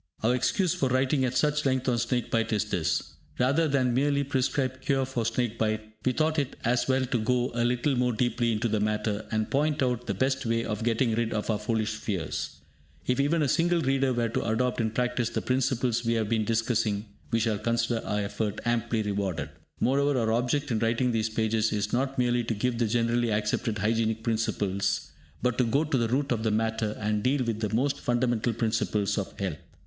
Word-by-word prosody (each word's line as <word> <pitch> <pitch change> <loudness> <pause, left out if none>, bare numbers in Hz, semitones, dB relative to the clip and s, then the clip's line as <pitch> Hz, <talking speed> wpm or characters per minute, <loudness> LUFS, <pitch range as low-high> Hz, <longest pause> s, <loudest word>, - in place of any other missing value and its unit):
Our 115 +3 +3
excuse 170 - +1
for 135 - 0
writing 130 +1 +2
at 125 0 -1
such 150 0 +2
length 130 -1 0
on 120 -2 +2
snake 120 0 -1
bite 115 0 +1
is 105 -2 +1
this. - - -1 0.2
Rather 140 +6 +2
than 130 -4 +2
merely 140 +2 +2
prescribe 130 -1 -1
cure 135 -1 +1
for 120 -4 -2
snake 115 -1 -1
bite, 110 0 -1
we 130 - +2
thought 155 +3 +1
it 140 -3 -2
as 120 +1 +2
well 130 0 +2
to 125 -1 -1
go 125 +3 +1
a 120 0 0
little 125 +3 +1
more 125 0 +2
deeply 120 0 0
into 110 +1 0
the 110 -1 0
matter, 105 0 -1
and 110 -1 -1
point 150 0 +1
out 125 -1 -1
the 100 - -1
best 130 +6 0
way 115 -1 0
of 105 0 -3
getting 115 0 +1
rid 115 0 0
of 110 +1 -1
our 105 - -1
foolish 110 0 -1
fears. 100 -6 -4 0.4
If 125 +1 0
even 150 +3 +2
a - - +2
single 170 +4 +2
reader 135 -1 +2
were 120 -2 0
to - - -1
adopt 120 +2 0
in 110 - +1
practice 125 +1 0
the - - -3
principles 125 -2 +1
we 115 0 +1
have 110 -2 0
been 110 -2 +1
discussing, 110 -2 0 0.2
we 115 - +1
shall 110 -2 0
consider 115 +1 0
our 105 0 -1
effort 105 +1 -2
amply 120 -1 0
rewarded. 100 -4 -2 0.3
Moreover, 140 +2 +2
our 110 -1 +1
object 125 +5 0
in 110 - +1
writing 115 +3 +1
these 115 -1 0
pages 110 0 +1
is 105 0 -2
not 135 +2 0
merely 120 -1 +2
to 115 - -1
give 120 +3 -1
the 115 - +2
generally 120 +1 +1
accepted 105 +1 0
hygienic 110 +1 0
principles, 105 -4 -1 0.3
but 125 0 +1
to - - +5
go 125 +6 +2
to 150 -3 0
the 115 - +1
root 135 +4 0
of 115 -3 +1
the 110 - +1
matter, 110 0 -1
and 105 -1 0
deal 130 +3 +1
with 115 -2 -2
the 105 -2 -2
most 135 +4 +1
fundamental 120 -1 +1
principles 110 -2 0
of 100 - -6
health. 95 -6 -2
115 Hz, 210 wpm, -27 LUFS, 110-130 Hz, 0.4 s, to